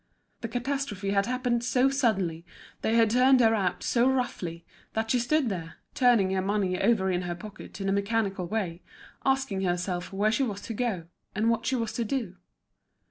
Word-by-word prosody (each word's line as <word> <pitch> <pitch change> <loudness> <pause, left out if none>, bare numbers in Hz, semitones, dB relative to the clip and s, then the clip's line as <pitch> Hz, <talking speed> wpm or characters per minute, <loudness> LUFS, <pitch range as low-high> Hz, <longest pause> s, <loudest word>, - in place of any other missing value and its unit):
The 230 - -4
catastrophe 245 -5 -2
had 200 +1 +2
happened 250 -1 0
so 255 +2 +3
suddenly, 195 - 0 0.4
they 225 - +1
had 225 -2 +4
turned 255 +2 +5
her 225 -2 +5
out 195 -5 0
so 245 +2 +3
roughly, 180 -10 -2 0.3
that 220 0 -1
she 250 - +3
stood 275 +3 +1
there, 165 -5 -5 0.2
turning 235 -7 +4
her 190 0 +1
money 190 -2 0
over 195 -3 +3
in 180 0 0
her 175 -1 -3
pocket 205 +1 -10
in 195 - -2
a - - +2
mechanical 200 -2 0
way, 185 -4 -3 0.5
asking 270 -8 +1
herself 180 -1 -2
where 205 +2 +1
she 230 - +1
was 205 -6 -2
to 225 - -6
go, 215 -7 -2 0.3
and 220 +3 +2
what 230 0 -1
she 260 - +1
was 230 -3 -2
to 235 - -1
do. 220 -6 -3
215 Hz, 190 wpm, -28 LUFS, 190-245 Hz, 0.5 s, turned